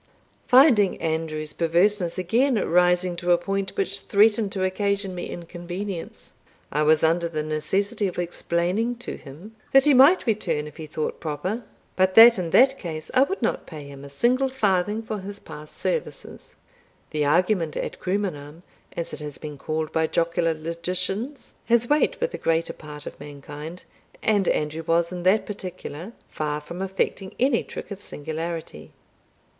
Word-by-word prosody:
Finding 245 -7 +5
Andrew's 160 -1 -2
perverseness 175 +2 +2
again 235 +9 +2
rising 180 -2 +2
to 175 0 +2
a - - +4
point 195 +2 -3
which 395 - 0
threatened 210 0 +3
to 190 - -1
occasion 200 0 -1
me 175 - -5
inconvenience, 175 +2 -7 0.4
I 150 - 0
was 155 +1 +4
under 170 +1 +2
the 155 -2 -3
necessity 190 +7 -1
of 180 - -6
explaining 175 +6 -1
to 240 - -7
him, 170 +11 -12 0.2
that 270 +1 +7
he 295 - +6
might 275 +8 +6
return 210 - 0
if 150 - -11
he 160 -2 -7
thought 155 0 -3
proper, 185 +9 -3 0.3
but 185 0 +2
that 230 -1 +9
in 175 -2 -2
that 265 +9 +5
case 155 -3 -6
I 260 - +5
would 380 +9 0
not - - -1
pay 155 -3 -8
him 140 -1 -11
a 140 - -9
single 250 - +2
farthing 210 -3 0
for 215 -1 -4
his 200 +1 -7
past 150 -5 -10
services. 485 -2 -4 0.6
The 155 -2 0
argument 165 +2 +2
ad - - -4
crumenam, 175 -5 -3 0.3
as 170 - -3
it - - -5
has 150 -2 -6
been 150 -2 -8
called 155 +1 -3
by 160 0 +1
jocular 165 0 +1
logicians, 180 - -3
has 235 0 +3
weight 295 +3 +2
with 485 +1 -1
the - - -6
greater 165 0 0
part 150 -2 -10
of - - -9
mankind, 145 +4 -9 0.4
and 205 -3 +2
Andrew 150 +2 0
was 170 +1 +1
in 180 -1 -5
that 190 +4 +3
particular 185 -1 -7
far 150 -1 -3
from 170 +4 -8
affecting 190 0 -2
any 255 -2 +2
trick - - -9
of 200 0 -6
singularity. 160 - -6
180 Hz, 165 wpm, -24 LUFS, 160-210 Hz, 0.6 s, that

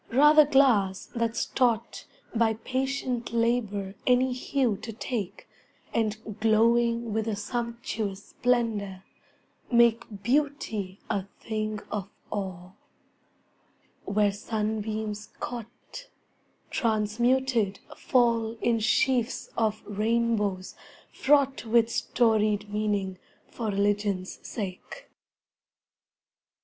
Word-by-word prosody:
Rather 295 +3 +7
glass 230 -10 +3
that's 230 0 0
taught 235 -4 0 0.3
By 225 -1 +2
patient 260 -1 -2
labor 225 -4 0
any 250 0 +4
hue 255 -2 0
to 225 - -7
take 220 -3 -5 0.5
And 220 -1 -2
glowing 230 +1 +3
with 220 0 -1
a 220 - 0
sumptuous 220 -2 -4
splendor, 220 -6 0 0.7
make 235 -3 +3
Beauty 235 -7 -1
a 195 -2 -1
thing 215 -1 -3
of 200 -2 -3 0.2
awe; 185 -3 -4 1.3
where 205 0 +2
sunbeams 215 0 -3
caught, 245 - -8 0.6
Transmuted 230 0 +1 0.2
fall 230 -3 +2
in 230 -1 +2
sheafs 245 +2 +1
of 220 -2 0
rainbows 210 -2 0 0.4
fraught 275 -1 +3
With 230 0 +3
storied 215 -4 +1
meaning 205 -3 -1 0.3
for 230 - -4
religion's 200 -2 0
sake. 200 - -7
220 Hz, 90 wpm, -27 LUFS, 205-240 Hz, 1.3 s, Rather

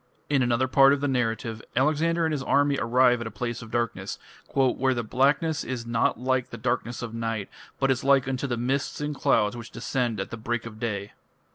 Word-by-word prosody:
In 140 -2 +3
another 120 +1 +2
part 135 +1 +6
of 140 - -1
the 145 - +1
narrative 115 -3 -1
Alexander 155 +5 +2
and 160 - 0
his 150 -3 -1
army 140 +1 +2
arrive 125 +1 +3
at 115 - -4
a 110 - -10
place 120 -1 -3
of 115 - -10
darkness 120 -1 -2 0.3
"where 130 -1 +2
the 120 - -1
blackness 140 +7 +1
is 125 -3 -4
not 115 -1 +1
like 130 0 0
the 115 - -7
darkness 120 +1 -2
of 115 -1 -5
night, 115 -3 -3 0.3
but 135 -1 +3
is 130 - -1
like 135 -1 +4
unto 135 +1 -2
the 120 -2 -2
mists 130 +4 -1
and 150 0 -2
clouds 105 -5 +2
which 120 -1 -8
descend 120 -2 -2
at 95 - -4
the 115 - -5
break 115 +1 -3
of 110 -2 -9
day". 100 -3 -3
125 Hz, 215 wpm, -26 LUFS, 115-135 Hz, 0.3 s, part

